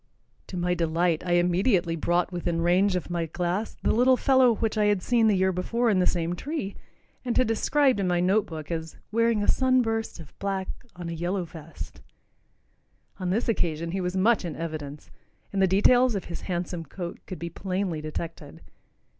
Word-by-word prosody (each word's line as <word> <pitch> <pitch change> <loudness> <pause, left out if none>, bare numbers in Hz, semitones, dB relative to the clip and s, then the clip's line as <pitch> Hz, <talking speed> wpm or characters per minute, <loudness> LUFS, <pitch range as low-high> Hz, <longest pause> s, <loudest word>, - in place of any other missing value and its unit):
To 185 - -6
my 180 0 +1
delight 165 0 +1
I 175 - +2
immediately 175 0 +2
brought 175 +3 0
within 175 -1 -1
range 185 +3 +3
of 180 -1 -3
my 170 -1 -1
glass 180 +6 -2
the - - +3
little 250 +3 +4
fellow 260 -4 +4
which 225 +1 -1
I 210 -1 +2
had 205 -3 +2
seen 235 -2 +3
the 210 - +4
year 190 0 +3
before 230 +6 0
in 190 - +2
the 180 - +2
same 170 0 0
tree, 270 - -4 0.5
and 245 -2 -1
had 255 - +4
described 260 +2 +2
in 195 - 0
my 175 -1 +2
note 190 +4 +2
book 155 -1 -7
as 160 -1 -4
"wearing 230 -1 +2
a - - -2
sun 255 -1 +3
burst 225 -4 -2
of 145 -6 -12
black 195 -1 -2 0.3
on 175 -1 -6
a 170 - -4
yellow 175 +3 -2
vest." 160 -1 -10 1.2
On 185 -1 -2
this 215 +7 0
occasion 165 -7 -1
he 190 +1 -2
was 180 +1 -2
much 215 +3 +3
in 170 -4 -4
evidence, 150 -3 -6 0.4
and 195 - +1
the 190 - +5
details 245 +6 +4
of 195 - -3
his 170 - -6
handsome 175 -1 -2
coat 175 +3 -7
could 185 - -6
be 170 0 -6
plainly 185 -3 -2
detected. 155 +2 -6
180 Hz, 195 wpm, -26 LUFS, 170-215 Hz, 1.2 s, the